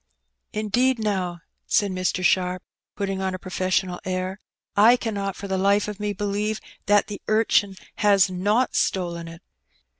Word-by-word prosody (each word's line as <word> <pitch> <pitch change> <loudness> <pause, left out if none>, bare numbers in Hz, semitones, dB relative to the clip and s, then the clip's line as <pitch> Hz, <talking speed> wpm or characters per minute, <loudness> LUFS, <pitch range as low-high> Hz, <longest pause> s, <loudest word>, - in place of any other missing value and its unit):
" 60 -1 -55
Indeed, 240 +5 +1
now, 190 -6 -2 0.3
said 205 -3 +2
Mr. 185 0 -1
Sharp, 180 0 +2 0.3
putting 195 -1 -2
on 190 -1 -1
a - - -4
professional 185 -1 -1
air, 185 +1 -3 0.2
" - - -60
I 245 - +7
cannot 200 -5 -3
for 200 - -7
the 190 -1 -1
Ufe 200 +2 +3
of 210 -1 -6
me 210 0 -1
believe 205 +2 -2 0.3
that 205 0 +4
the 205 -2 -7
urchin 215 -2 +2 0.2
has 200 -3 +5
not 205 +7 +1
stolen 170 -3 -1
it. 165 0 -11
195 Hz, 160 wpm, -24 LUFS, 185-210 Hz, 0.3 s, I